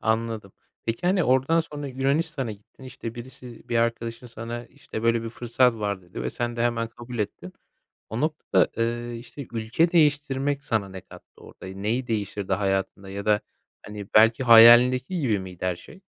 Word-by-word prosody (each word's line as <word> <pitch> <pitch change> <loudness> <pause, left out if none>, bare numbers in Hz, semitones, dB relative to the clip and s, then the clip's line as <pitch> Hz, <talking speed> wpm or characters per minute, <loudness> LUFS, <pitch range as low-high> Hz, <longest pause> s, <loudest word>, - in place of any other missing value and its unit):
Anladım. 110 -2 -1 0.3
Peki, 115 +10 -2
hani, 185 -1 +3
oradan 130 +6 +3
sonra 150 -3 -6
Yunanistan'a 135 0 -1
gittin, 105 +5 -17
işte, 130 -3 -7
birisi 125 0 -11
bir 120 - 0
arkadaşın 115 +1 -1
sana, 115 +1 -7
işte, 110 - -8
böyle 115 0 +2
bir 115 - -4
fırsat 120 +1 +1
var, 100 -3 -3
dedi 85 -8 -8
ve 60 - -2
sen 120 - -3
de 115 - 0
hemen 115 -1 0
kabul 120 +1 -9
ettin. 90 -3 -4 0.6
O 110 +3 -4
noktada, 155 0 +1
eee, 120 +1 -2
işte, 135 +2 -10
ülke 120 +9 +1
değiştirmek 145 -3 +2
sana 110 -8 -1
ne 95 -1 -8
kattı? - - -16
Orada - - -13
neyi 105 +7 -2
değiştirdi 100 -3 -2
hayatında 95 0 -1
ya 100 0 -6
da, 105 -1 +3 0.4
hani, 105 -1 -8
belki 115 +4 +6
hayalindeki 125 +7 +7
gibi 115 -8 +1
miydi 90 -1 -7
her 90 -1 0
şey? 190 - -15
115 Hz, 170 wpm, -25 LUFS, 105-130 Hz, 0.6 s, hayalindeki